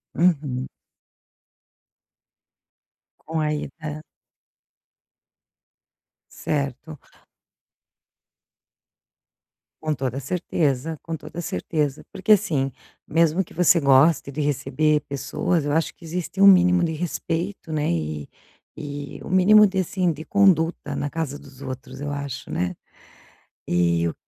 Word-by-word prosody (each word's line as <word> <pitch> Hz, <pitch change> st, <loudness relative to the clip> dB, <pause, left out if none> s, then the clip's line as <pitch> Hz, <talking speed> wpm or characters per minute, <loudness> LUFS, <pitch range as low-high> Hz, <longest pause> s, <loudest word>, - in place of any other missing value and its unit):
Uhum. 145 Hz, -7 st, +1 dB, 2.6 s
Com 160 Hz, 0 st, -2 dB
a -, -, 0 dB
ida 150 Hz, +1 st, -6 dB, 2.3 s
Certo. 140 Hz, +1 st, -3 dB, 2.8 s
Com 155 Hz, -1 st, 0 dB
toda 130 Hz, -1 st, -3 dB
certeza, 155 Hz, -1 st, -1 dB
com 165 Hz, -, -5 dB
toda 165 Hz, +2 st, -9 dB
certeza. 150 Hz, -4 st, -2 dB
Porque 215 Hz, +3 st, +3 dB
assim, 145 Hz, -9 st, +1 dB, 0.4 s
mesmo 165 Hz, +3 st, +2 dB
que -, -, -17 dB
você 175 Hz, 0 st, +4 dB
goste 140 Hz, +1 st, +4 dB
de 140 Hz, +2 st, -4 dB
receber 150 Hz, +1 st, +1 dB
pessoas, 150 Hz, +4 st, -1 dB
eu 145 Hz, -, -1 dB
acho 160 Hz, +1 st, +1 dB
que -, -, -19 dB
existe 180 Hz, +3 st, -4 dB
um 200 Hz, -, +9 dB
mínimo 180 Hz, -1 st, +6 dB
de 165 Hz, -, 0 dB
respeito, 165 Hz, +2 st, -3 dB
né, 150 Hz, -1 st, 0 dB
e 75 Hz, -3 st, -2 dB, 0.5 s
e 145 Hz, -1 st, -7 dB
o -, -, -7 dB
mínimo 210 Hz, +3 st, +6 dB
de, 190 Hz, 0 st, -2 dB
assim, 185 Hz, 0 st, 0 dB
de 155 Hz, +1 st, -8 dB
conduta 165 Hz, -7 st, +2 dB
na 145 Hz, -, -2 dB
casa 145 Hz, -3 st, -3 dB
dos 135 Hz, -1 st, -15 dB
outros 130 Hz, 0 st, -7 dB
eu 145 Hz, 0 st, -4 dB
acho, 140 Hz, -2 st, -5 dB
né. 90 Hz, 0 st, -1 dB, 0.9 s
E 85 Hz, -1 st, +2 dB
o -, -, -4 dB
150 Hz, 115 wpm, -23 LUFS, 140-170 Hz, 2.8 s, um